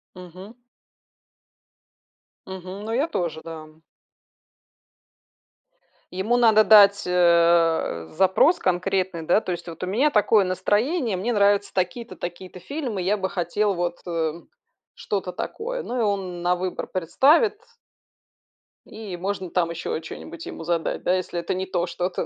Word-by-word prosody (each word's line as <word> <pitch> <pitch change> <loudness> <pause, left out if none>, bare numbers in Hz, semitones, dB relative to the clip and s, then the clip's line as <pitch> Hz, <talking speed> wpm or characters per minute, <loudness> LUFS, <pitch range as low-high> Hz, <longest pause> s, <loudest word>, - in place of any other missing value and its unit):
Мгм. 185 +4 -11 1.9
Мгм, 190 +1 -8
ну 225 - -4
я 270 +7 +1
тоже, 165 - -3
да. 160 -1 -9 2.5
Ему 215 +6 +1
надо 220 -3 +5
дать, 200 -2 +6
э, 170 - +3
запрос 190 - +3
конкретный, 180 -1 -1
да, 175 +7 +3
то - - -4
есть: 175 0 -5
вот 165 0 -9
у 180 - -2
меня 265 +10 +2
такое 210 -1 +4
настроение, 215 - 0
мне 235 +6 -1
нравятся 205 -1 +2
такие-то, 190 +6 -3
такие-то 180 +1 -8
фильмы, 255 - -4
я 200 +4 +1
бы 190 -1 -3
хотел 195 +4 0
вот, 175 -1 -2
э, - - -7
м, 165 0 -3 0.5
что-то 195 -3 -4
такое. - - -5
Ну, 250 - -4
и - - +2
он 185 -4 -2
на 180 0 +2
выбор 180 0 -4
представит 285 - +2 1.3
и 210 -4 -8
можно 190 0 -4
там 170 -1 0
еще 170 -1 -4
чё-нибудь 165 +1 -9
ему - - -8
задать, 170 -1 -2
да, 180 - +2
если 180 -1 -3
это 170 - -3
не 185 +1 -3
то 175 -2 -2
что-то. 180 +1 -3
185 Hz, 140 wpm, -24 LUFS, 175-210 Hz, 2.5 s, дать